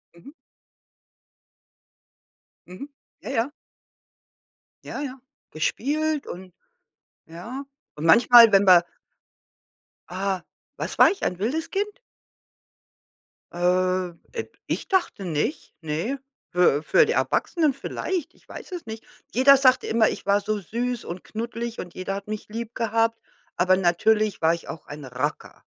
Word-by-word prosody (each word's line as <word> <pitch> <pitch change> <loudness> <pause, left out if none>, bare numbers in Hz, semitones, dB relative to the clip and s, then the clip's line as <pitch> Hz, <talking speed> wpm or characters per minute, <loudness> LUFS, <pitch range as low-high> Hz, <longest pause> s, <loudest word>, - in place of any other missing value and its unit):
Mhm. 220 +12 -14 2.4
Mhm, 185 +11 -9 0.3
ja, - - -7
ja. 250 +2 0 1.3
Ja, - - -6
ja, 270 -2 -6 0.3
gespielt 295 - -1
und 185 0 -9 0.7
ja. 225 - -8 0.3
Und 155 +2 -3
manchmal, 235 +5 +8
wenn 195 0 +6
wir 175 -2 +7 1.3
Ah, 190 -1 -2 0.3
was - - -4
war - - +8
ich? 400 - -7
Ein 180 - -1
wildes 310 +10 -2
Kind? 410 +3 -2 1.6
Äh, 185 +1 +1 0.2
äh, 455 - -3 0.2
ich - - -3
dachte 365 - 0
nicht, 165 - -2
ne, 165 - -3 0.3
für 170 -4 +3
für 475 - +5
die 465 - 0
Erwachsenen 315 - +1
vielleicht, 330 +4 -4
ich - - -28
weiß - - -10
es 355 -2 -6
nicht. 220 0 -8 0.3
Jeder 275 +3 +7
sagte 260 -1 +4
immer, 220 -1 +3
ich - - -6
war 200 +1 +3
so 215 +1 -2
süß 240 +5 -3
und 175 +1 -7
knuddelig 230 +1 -5
und 175 -1 -7
jeder 185 +1 -4
hat 200 +1 -7
mich 215 0 -5
lieb 230 +1 -6
gehabt, 230 0 0 0.4
aber 185 +1 +3
natürlich 210 +4 +2
war 160 0 +4
ich 170 - -6
auch 160 - -8
ein 145 0 -9
Racker. 130 +4 -4
215 Hz, 135 wpm, -24 LUFS, 180-265 Hz, 2.4 s, manchmal